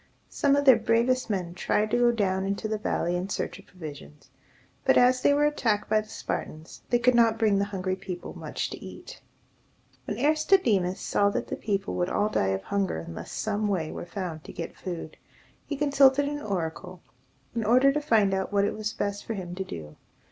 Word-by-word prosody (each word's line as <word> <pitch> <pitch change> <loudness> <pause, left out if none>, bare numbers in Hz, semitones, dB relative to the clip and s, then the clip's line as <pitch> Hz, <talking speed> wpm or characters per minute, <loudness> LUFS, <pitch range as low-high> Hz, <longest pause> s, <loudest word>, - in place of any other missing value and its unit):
Some 280 -1 +2
of 285 0 +1
their 260 -4 +8
bravest 235 +3 +1
men 180 -4 -2
tried 210 +4 0
to 240 - +3
go 240 0 +5
down 190 -4 0
into 200 +3 -2
the 215 0 -2
valley 175 -4 -1
in 180 +2 -3
search - - -3
of - - -17
provisions; 145 - -11 0.5
but, - - +4
as 250 +1 +5
they - - +4
were 290 +1 +3
attacked 225 -9 0
by 215 0 +4
the 215 - -15
Spartans, 155 -5 -6
they 240 - +4
could 245 +1 +3
not 230 -2 +4
bring 215 -3 +3
the 200 - +1
hungry 190 -2 -2
people 185 -2 -7
much - - -4
to - - -8
eat. - - -10 0.8
When - - -4
Aristodemus 290 - +2
saw 200 0 +2
that - - -2
the - - -2
people 200 -2 -2
would 180 0 0
all 210 +1 +1
die 95 - +1
of 95 0 -1
hunger 200 - -1
unless 80 +1 -7
some 215 0 -1
way 175 -6 -1
were - - -7
found 175 -5 -5
to - - -8
get 165 - -6
food, 170 -4 -6 0.5
he 295 - -2
consulted 280 -1 +4
an 290 0 -3
oracle, 180 - -4 0.5
in 230 -1 -1
order 255 +5 +5
to 300 - 0
find 215 -8 +3
out 190 +1 -1
what 200 -1 +3
it - - -1
was 215 0 -3
best 205 -1 -3
for 225 - -4
him 180 -3 -6
to 190 +1 -3
do. 75 - -9
205 Hz, 205 wpm, -27 LUFS, 185-240 Hz, 0.8 s, their